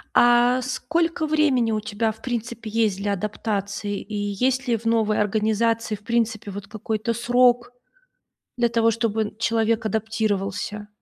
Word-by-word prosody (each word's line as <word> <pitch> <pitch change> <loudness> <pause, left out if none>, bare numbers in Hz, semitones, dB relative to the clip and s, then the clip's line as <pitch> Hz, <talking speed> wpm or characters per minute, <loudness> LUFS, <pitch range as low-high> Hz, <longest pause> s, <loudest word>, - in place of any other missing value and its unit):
А 240 +1 +5
сколько 330 +6 -1
времени 295 -7 +2
у 215 - 0
тебя, 215 +1 -1
в 220 +1 -15
принципе, 235 -2 -4
есть 215 -3 +1
для 200 +1 -1
адаптации? 205 0 -3
И 215 - -10
есть 245 +6 0
ли 235 -2 +2
в 225 - -14
новой 225 -2 +2
организации, 220 +2 +1
в 205 - -15
принципе, 230 -2 -1
вот 200 +1 -7
какой-то 220 +1 -2
срок, 245 +1 +3 0.9
для 240 -1 +2
того 230 -1 +3
чтобы 225 -1 0
н 210 - -7
человек 230 0 +1
адаптировался? 210 -1 -2
225 Hz, 145 wpm, -23 LUFS, 210-240 Hz, 0.9 s, А